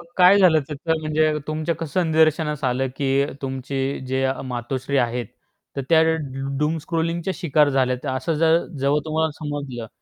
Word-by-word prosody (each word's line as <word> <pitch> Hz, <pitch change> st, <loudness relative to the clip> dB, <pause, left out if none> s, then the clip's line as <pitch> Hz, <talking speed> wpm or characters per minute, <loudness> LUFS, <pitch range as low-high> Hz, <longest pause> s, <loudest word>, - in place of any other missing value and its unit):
मग -, -, -12 dB
काय 185 Hz, +2 st, +7 dB
झालं, 170 Hz, -5 st, +5 dB
त्याचं 155 Hz, +2 st, -2 dB
म्हणजे 155 Hz, 0 st, +1 dB
तुमच्या 155 Hz, +2 st, -2 dB
कसं 170 Hz, +3 st, -1 dB
निदर्शनास 155 Hz, -1 st, +2 dB
आलं, 130 Hz, +1 st, +1 dB
की 140 Hz, 0 st, +1 dB, 0.2 s
तुमची 135 Hz, +1 st, -3 dB
जे 130 Hz, +1 st, -1 dB
या 130 Hz, 0 st, +2 dB
मातोश्री 130 Hz, +2 st, -3 dB
आहेत. 120 Hz, 0 st, 0 dB, 0.5 s
तर 140 Hz, -, -1 dB
त्या 160 Hz, -1 st, +6 dB
डु 140 Hz, -5 st, -1 dB
डूम 150 Hz, +2 st, +1 dB
स्क्रॉलिंगच्या 165 Hz, +3 st, -2 dB
शिकार 150 Hz, -2 st, +3 dB
झाल्यात, 130 Hz, 0 st, 0 dB
असं 155 Hz, +5 st, -1 dB
ज -, -, -1 dB, 0.4 s
जेव्हा 140 Hz, +2 st, +2 dB
तुम्हाला 160 Hz, 0 st, 0 dB
समजलं. 145 Hz, -6 st, -5 dB
150 Hz, 160 wpm, -22 LUFS, 135-160 Hz, 0.5 s, काय